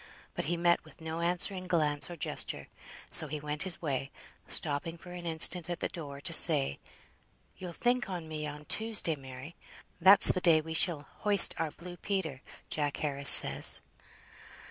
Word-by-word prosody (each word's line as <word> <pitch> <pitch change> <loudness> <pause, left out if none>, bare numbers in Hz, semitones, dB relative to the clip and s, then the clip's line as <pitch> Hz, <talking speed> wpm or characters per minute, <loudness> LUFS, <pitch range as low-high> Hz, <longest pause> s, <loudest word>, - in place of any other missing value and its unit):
But - - -5
he 170 +3 -3
met 170 0 +1
with - - -19
no 160 0 -7
answering 180 +2 -2
glance 150 -4 -1
or 175 - -8
gesture, 165 - -5 0.4
so - - +2
he 155 - -6
went 150 0 -6
his 185 -2 -1
way, 135 -3 -4 0.4
stopping 155 +2 -1
for 180 +1 -14
an 175 -1 -9
instant 165 +1 0
at 175 -1 -5
the - - -4
door 145 -5 -10
to - - -3
say, 70 +1 +6 0.8
"You'll 180 -2 -9
think 245 +4 -2
on 175 -4 -7
me 155 -1 -6
on 150 0 -10
Tuesday, 220 -5 0
Mary. 135 +3 -12 0.5
That's 195 +3 +7
the 185 - -4
day 165 -3 +3
we 160 +1 -8
shall 160 -4 -1
hoist 205 -1 +5
our 165 -1 -2
blue 175 +3 -12
Peter, 175 -11 -5 0.3
Jack 145 -2 -3
Harris 140 -2 +1
says." - - +6
165 Hz, 170 wpm, -29 LUFS, 150-180 Hz, 0.8 s, That's